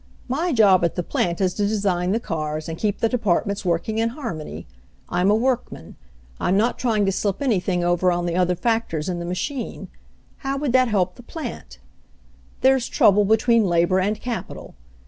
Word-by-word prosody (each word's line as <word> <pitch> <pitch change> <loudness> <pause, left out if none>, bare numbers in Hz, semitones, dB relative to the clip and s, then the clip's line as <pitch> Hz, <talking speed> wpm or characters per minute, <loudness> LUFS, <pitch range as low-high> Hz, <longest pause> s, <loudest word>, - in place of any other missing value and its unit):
"My 315 +8 -1
job 200 - +5
at 170 - 0
the 175 - -2
plant 170 0 -1
is 185 -2 +1
to 205 -1 0
design 190 -4 0
the 220 - +1
cars 155 -5 -4
and 165 - -4
keep 205 +3 -1
the 225 - +4
departments 200 -3 0
working 180 +5 -1
in 230 0 +1
harmony. 195 - -6 0.4
I'm 180 +2 +1
a 210 - +5
woricman. 240 - -2 0.5
I'm 185 +2 +1
not 230 +4 +1
trying 220 -5 +1
to 195 - +2
slip 200 0 -1
anything 190 -9 0
over 175 +1 +2
on 175 0 -1
the 170 -1 -1
other 180 0 +2
factors 200 -6 -1
in 175 -1 -3
the 170 - -5
machine. 240 - -4 0.5
How 275 0 -3
would 275 -3 -1
that 255 -1 +5
help 185 -5 0
the - - -11
plant? 240 - -8 0.8
"There's 265 -1 +3
trouble 205 0 +4
between 220 +1 +3
labor 175 +2 +2
and 205 +3 0
capital. 240 -1 -6
200 Hz, 185 wpm, -22 LUFS, 175-230 Hz, 0.8 s, job